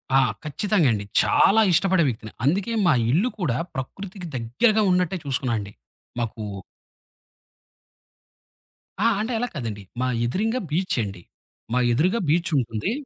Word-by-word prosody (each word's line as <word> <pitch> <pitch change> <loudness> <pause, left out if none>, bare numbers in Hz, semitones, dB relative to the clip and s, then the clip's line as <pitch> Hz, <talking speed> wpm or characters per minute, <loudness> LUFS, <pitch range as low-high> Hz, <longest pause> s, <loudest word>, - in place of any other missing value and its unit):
ఆ! 135 - +7 0.2
ఖచ్చితంగండి. 150 - +1 0.2
చాలా 220 +3 +4
ఇష్టపడే 190 0 +3
వ్యక్తిని. 110 -2 -6
అందుకే 195 +9 +1
మా 165 - +5 0.2
ఇల్లు 195 - +2
కూడా 135 - 0 0.2
ప్రకృతికి 180 +7 -6
దగ్గరగా 210 - +2
ఉన్నట్టే 180 0 +1
చూసుకున్నా 130 -3 -1
అండి. 100 0 -7 0.5
మాకు 110 -2 -3 2.6
ఆ! - - +6
అంటే 235 +3 -2
అలాగ 245 +1 -2
కాదండి. 110 -7 -4 0.2
మా 130 - +1 0.2
ఎదురింగా 220 - 0
బీచ్చండి. 115 - -1 0.5
మా 125 - +3
ఎదురుగా 180 - +2
బీచ్చుంటుంది. 145 - 0
155 Hz, 115 wpm, -24 LUFS, 120-195 Hz, 2.6 s, ఆ